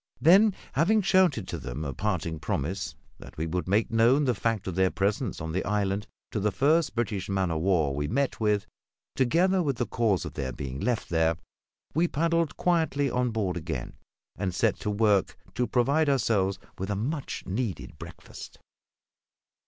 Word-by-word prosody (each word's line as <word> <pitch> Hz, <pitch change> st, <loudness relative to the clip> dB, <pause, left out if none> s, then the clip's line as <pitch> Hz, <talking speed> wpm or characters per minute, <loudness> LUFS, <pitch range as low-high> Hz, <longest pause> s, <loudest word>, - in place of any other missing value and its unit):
Then, 195 Hz, +6 st, +6 dB, 0.2 s
having 205 Hz, +8 st, +3 dB
shouted 175 Hz, -, +3 dB
to -, -, -4 dB
them 75 Hz, +6 st, -5 dB
a 70 Hz, -, -3 dB
parting 85 Hz, -3 st, -2 dB
promise 85 Hz, +7 st, -3 dB, 0.2 s
that -, -, -13 dB
we 80 Hz, -, -1 dB
would 90 Hz, +1 st, -2 dB
make 105 Hz, +4 st, +1 dB
known 120 Hz, +6 st, +4 dB
the 125 Hz, -, +2 dB
fact 115 Hz, -1 st, -1 dB
of 95 Hz, -, -3 dB
their 95 Hz, +1 st, +3 dB
presence 100 Hz, +2 st, -1 dB
on 80 Hz, 0 st, -4 dB
the 90 Hz, +3 st, -1 dB
island 100 Hz, -1 st, -1 dB, 0.2 s
to 105 Hz, -, -1 dB
the 105 Hz, +1 st, +1 dB
first 145 Hz, -, +2 dB
British 105 Hz, -5 st, -2 dB
man 95 Hz, -3 st, 0 dB
o' 80 Hz, -, -1 dB
war 80 Hz, -5 st, +2 dB
we 75 Hz, +1 st, -1 dB
met 135 Hz, -, -1 dB
with, 105 Hz, -2 st, +1 dB, 0.5 s
together 175 Hz, +9 st, +3 dB
with 140 Hz, -5 st, 0 dB
the 120 Hz, -, 0 dB
cause 110 Hz, -9 st, 0 dB
of -, -, -6 dB
their 65 Hz, -3 st, -3 dB
being 65 Hz, +1 st, -6 dB
left 120 Hz, +3 st, -1 dB
there, 80 Hz, -1 st, +2 dB, 0.6 s
we 170 Hz, +3 st, +2 dB
paddled 165 Hz, 0 st, 0 dB
quietly 160 Hz, -6 st, +1 dB
on 125 Hz, 0 st, +1 dB
board 105 Hz, -5 st, -1 dB
again, 80 Hz, -7 st, -4 dB, 0.4 s
and 90 Hz, -2 st, -3 dB
set -, -, +2 dB
to -, -, -3 dB
work 105 Hz, -2 st, +2 dB, 0.2 s
to 125 Hz, 0 st, 0 dB
provide 140 Hz, +5 st, +2 dB
ourselves 105 Hz, -8 st, +1 dB, 0.2 s
with 95 Hz, +1 st, -3 dB
a 100 Hz, -, 0 dB
much 135 Hz, +8 st, -3 dB
needed 105 Hz, +1 st, -4 dB
breakfast. -, -, -10 dB
105 Hz, 175 wpm, -27 LUFS, 90-140 Hz, 0.6 s, Then